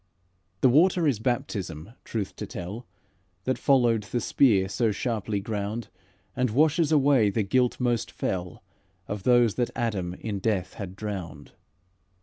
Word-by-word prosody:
The - - +6
water 170 +5 +4
is 130 -7 +1
baptism, 105 - -3
truth 105 -4 -4
to - - -5
tell, 100 +7 -7 0.6
That 130 -1 -1
followed 120 -5 +3
the 105 +4 -3
spear 105 -5 +3
so 115 +2 0
sharply 105 -2 -2
ground, 105 +2 -4 0.5
And 125 0 +1
washes 155 +6 +3
away 140 -7 +4
the 110 +2 0
guilt 125 +5 +1
most 120 -3 0
fell 90 -1 -4 0.4
Of 105 -1 -4
those 120 -1 +4
that 120 - +1
Adam 95 -7 -2
in 105 -1 -4
death 95 -3 -1
had 95 -3 -7
drowned. 95 -8 -6
110 Hz, 140 wpm, -26 LUFS, 100-125 Hz, 0.6 s, The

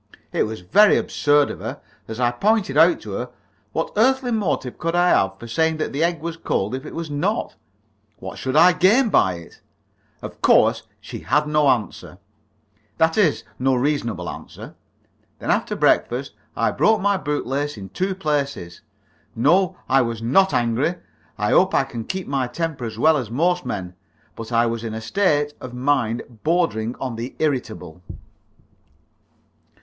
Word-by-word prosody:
It - - 0
was 110 -3 -7
very 200 - +5
absurd 145 -1 +2
of - - -8
her. - - -6 0.3
As 110 +1 -7
I 120 -1 +2
pointed 200 - +1
out 165 +3 +5
to 105 - -8
her, 125 +6 -4 0.4
what 160 - -3
earthly 255 +3 +2
motive 185 - -2
could 165 +1 -1
I 175 0 +4
have 95 - +2
for 120 - -10
saying 160 +6 0
that 155 -3 -3
an 145 - -1
egg 170 -2 0
was 165 0 -5
cold 105 -9 -2
if 130 +3 -5
it - - -9
was 165 -2 -5
not? 180 +10 -2 0.6
What 95 - -8
should 130 +1 -3
I 180 +4 +7
gain 220 +8 +4
by 95 - +3
it? 85 -1 -13 0.6
Of - - -9
course - - +4 0.2
she - - -8
had 150 +3 +1
no 150 -1 +2
answer 105 -6 -2 0.8
that 160 0 +2
is, 195 -9 +2 0.2
no 130 +1 +2
reasonable 130 -3 -1
answer. - - -9 0.6
Then - - -2
after - - 0
breakfast - - +1 0.2
I - - +1
broke 220 0 +3
my 200 +1 +2
boot 150 -5 -3
lace 140 +1 -2
in 95 -1 -9
two 190 - -2
places. 140 - -3 0.5
No, 180 +9 +2
I 135 +1 +4
was 115 -2 -2
not 165 +13 +3
angry. 120 +8 0 0.4
I - - 0
hope - - +4
I - - +4
can 115 -2 -7
keep 190 -1 -4
my 135 -3 -1
temper 160 -3 -4
as 110 -1 -6
well 155 +6 +4
as 125 -6 -4
most 175 +8 0
men. 90 -3 -4 0.4
But 115 +1 -8
I 115 0 +3
was 115 0 -3
in 110 -1 -4
a - - -4
state 145 - 0
of 125 -1 -8
mind 125 -3 0 0.2
bordering 125 -9 0
on 125 -4 -5
the 120 +3 -6
irritable. 125 - -3
145 Hz, 175 wpm, -22 LUFS, 115-170 Hz, 0.8 s, I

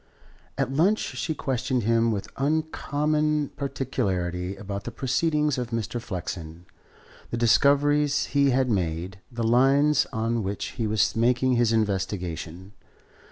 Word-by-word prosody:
At 130 - -1
lunch 185 +9 +3
she 150 +1 -3
questioned 130 -2 -1
him 115 +1 +2
with 100 -3 -3
uncommon 150 0 0
particularity 95 -10 -2
about 100 0 -6
the - - -3
proceedings 150 +2 0
of 120 -2 -3
Mr. 115 0 -3
Flexen, 85 -5 -6 0.6
the 115 - -3
discoveries 145 +5 +3
he 140 -1 +4
had 130 0 +2
made, 90 -1 -2
the 120 -1 -3
lines 135 +5 +4
on 115 +1 -1
which 100 0 -3
he 115 -3 -3
was 110 0 +1
making 125 +3 +2
his 120 -2 +3
investigation. 95 -4 -2
120 Hz, 125 wpm, -25 LUFS, 100-140 Hz, 0.6 s, he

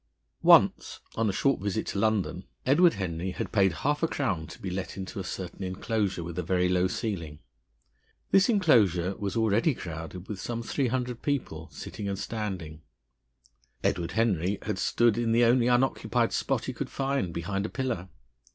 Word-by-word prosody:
Once, - - +5
on 115 -1 +1
a - - +2
short 135 +3 +1
visit 105 +2 -1
to 100 - -3
London, 100 -4 0 0.2
Edward 165 +7 +5
Henry 90 -1 -3
had 90 - -4
paid 95 -3 +4
half 150 +1 +1
a 165 - +3
crown 95 - -2
to - - -11
be 95 - -4
let 95 0 -4
into 95 +1 -5
a - - -3
certain 90 +1 -6
enclosure 95 0 -1
with 85 +1 -5
a - - +1
very 90 +1 +1
low 90 0 +2
ceiling. 85 -6 -4 0.9
This 195 +4 +5
enclosure 105 - +3
was 100 -2 -3
already 115 +6 +2
crowded 85 +1 -7
with 105 -3 -5
some 115 -1 -3
three 135 +3 0
hundred 125 -1 -2
people, 85 - -2
sitting 100 -1 -6
and 100 - -2
standing. 95 -8 -5 1.0
Edward 85 -1 0
Henry 100 -4 +1
had 105 -2 -2
stood 120 +3 +2
in 115 -1 +1
the 120 +1 +4
only 120 +1 +4
unoccupied 125 +2 +2
spot - - 0
he - - -3
could - - -4
find, 135 -9 -1
behind 100 +5 -2
a - - -10
pillar. 120 -9 -3
100 Hz, 175 wpm, -28 LUFS, 90-120 Hz, 1.0 s, Once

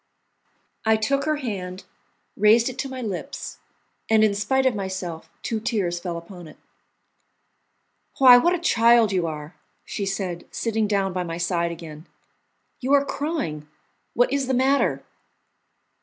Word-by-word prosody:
I 220 0 +4
took 275 +6 0
her 310 0 +1
hand, 195 -9 -5 0.5
raised 220 +4 +4
it 255 0 -9
to 270 - -3
my 260 -1 -6
lips, 220 +7 -6 0.5
and 220 -1 +5
in 215 -2 +3
spite 240 +7 0
of 260 - +3
myself 190 -5 -5
two 225 - -2
tears 205 -7 -1
fell 175 -1 -4
upon 175 0 -10
it. 155 - -14 1.6
"Why, 255 -2 +9
what 345 +7 +2
a - - -4
child 235 - +4
you 180 -3 0
are!" 155 0 -6 0.3
she 200 - -4
said, 190 -3 -4
sitting 225 -2 -1
down 195 -2 0
by 180 - -1
my 165 -1 -4
side 170 -1 0
again. 160 -1 -10 0.7
"You 265 +2 0
are 280 0 +5
crying! 275 - -3 0.5
What 245 +2 +3
is 275 -2 0
the 260 - +1
matter?" 270 +2 +2
210 Hz, 150 wpm, -24 LUFS, 175-260 Hz, 1.6 s, Why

